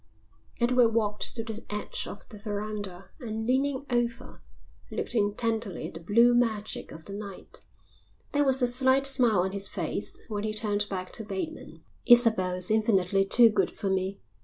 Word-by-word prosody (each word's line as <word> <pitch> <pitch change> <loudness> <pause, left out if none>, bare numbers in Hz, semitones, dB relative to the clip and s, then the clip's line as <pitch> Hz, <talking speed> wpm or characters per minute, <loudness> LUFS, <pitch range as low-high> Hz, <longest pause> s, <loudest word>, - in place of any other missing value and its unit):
Edward 240 -1 +3
walked 210 -2 0
to 225 - -3
the 220 0 -7
edge 210 0 -3
of 205 - -10
the 210 - -10
verandah 205 -3 -5
and 220 -3 -4
leaning 265 +2 0
over 240 -1 -2 0.5
looked - - -3
intently 220 0 -1
at - - -15
the 165 - -8
blue 235 +8 +4
magic 220 -3 -1
of 160 0 -11
the 200 - -7
night. 200 -2 -6 0.7
There 290 0 +2
was 265 -2 +2
a - - +4
slight 260 +2 +2
smile 245 -8 +4
on 190 +1 -1
his 200 0 -2
face - - -4
when 210 -3 -4
he 215 0 -2
turned 205 -1 -1
back 185 -2 -4
to 225 - -4
Bateman. 210 +10 -6 0.2
"Isabel 220 -7 +6
is 180 +2 +3
infinitely 195 -3 +2
too 230 +3 +5
good - - +1
for 195 - -3
me. 190 +1 -1
215 Hz, 170 wpm, -28 LUFS, 200-240 Hz, 0.7 s, Isabel